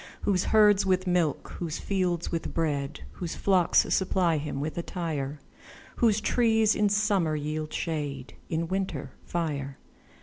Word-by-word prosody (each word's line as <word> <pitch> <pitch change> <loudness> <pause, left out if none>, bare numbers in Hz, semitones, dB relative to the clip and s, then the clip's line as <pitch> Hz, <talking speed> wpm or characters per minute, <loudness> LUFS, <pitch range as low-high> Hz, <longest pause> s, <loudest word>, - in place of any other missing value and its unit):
Whose 185 -3 +1
herds 210 -2 +5
with 185 -1 +1
milk, 175 -5 0
whose 165 -3 -3
fields 180 -4 -1
with 165 - -3
bread, 145 -3 -1
Whose 175 -2 -5
flocks 185 -3 +4
supply 180 -3 +2
him 145 -2 -4
with 150 +2 -3
attire; 155 -5 -3 0.6
Whose 220 -3 +3
trees 225 -1 +3
in 210 -1 +2
summer 200 -6 +2
yield 155 +1 -3
shade, 145 -5 -3 0.2
In 165 +1 -1
winter, 190 +2 -3
fire. 145 -5 -3
170 Hz, 135 wpm, -28 LUFS, 155-195 Hz, 0.6 s, herds